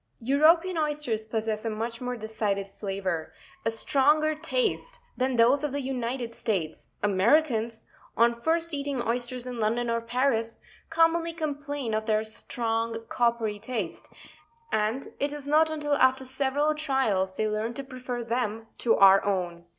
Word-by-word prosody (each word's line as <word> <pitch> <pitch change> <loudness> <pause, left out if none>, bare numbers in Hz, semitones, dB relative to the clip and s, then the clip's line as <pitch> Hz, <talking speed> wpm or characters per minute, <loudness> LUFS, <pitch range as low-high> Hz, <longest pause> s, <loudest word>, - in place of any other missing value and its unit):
European 320 +8 +3
oysters 295 -8 -1
possess 220 -1 -2
a 225 - -1
much 230 +2 -4
more 250 0 -3
decided 210 -3 -2
flavour, 190 -5 -3 0.3
a 225 - +1
stronger 295 +7 +3
taste, 485 +9 -2 0.2
than 255 0 0
those 245 +5 +4
of 295 - -1
the 285 - -2
United 250 -2 -3
States; 185 -10 -2 0.2
Americans, 225 +2 +2 0.3
on 235 +1 +5
first 325 +7 -1
eating 280 -2 -2
oysters 240 +1 -2
in 250 -2 -5
London 230 +2 0
or 230 0 0
Paris, 230 -1 0 0.3
commonly 330 +1 +3
complain 290 -6 -3
of 215 +1 -1
their 215 0 +2
strong 225 +1 -3
coppery 230 -3 0
taste, 220 -6 -4 0.6
and 220 +5 0
it 285 +1 0
is 295 -1 -6
not 310 +2 +4
until 295 -2 -1
after 260 -1 +3
several 275 +3 0
trials 260 -11 0
they 215 - +1
learn 215 +2 -1
to 275 - -4
prefer 255 -2 -5
them 230 -2 -2
to 235 - +3
our 195 0 +7
own. 175 -4 -2
240 Hz, 150 wpm, -27 LUFS, 220-285 Hz, 0.6 s, our